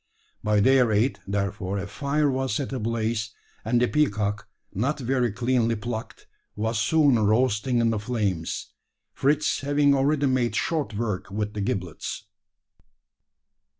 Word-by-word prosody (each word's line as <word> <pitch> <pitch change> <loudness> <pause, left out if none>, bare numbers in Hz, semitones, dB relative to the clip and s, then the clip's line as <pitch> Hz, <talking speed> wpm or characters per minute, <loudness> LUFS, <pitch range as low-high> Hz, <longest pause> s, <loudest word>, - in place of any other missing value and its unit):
By 105 -1 +3
their 130 0 +4
aid, 110 +6 +1
therefore, 100 -1 -2
a 100 - -3
fire 140 +8 0
was 130 -4 -1
set 135 +1 -3
ablaze; 115 -2 -2 0.3
and 120 +2 +2
the 125 - +3
peacock, 105 -9 0 0.3
not 125 +10 0
very 125 -2 0
cleanly 120 0 +1
plucked, 110 +1 -6 0.3
was 110 +1 -1
soon 145 -1 +4
roasting 110 +3 +2
in 115 -1 +3
the 110 - -1
flames 105 -7 -2 0.4
Fritz 150 +2 +1
having 145 0 +3
already 140 +1 +2
made 130 -3 +1
short 155 -9 -1
work 105 -4 -3
with 105 +1 -3
the 105 - -3
giblets. 90 -5 -4
115 Hz, 135 wpm, -25 LUFS, 105-135 Hz, 0.4 s, their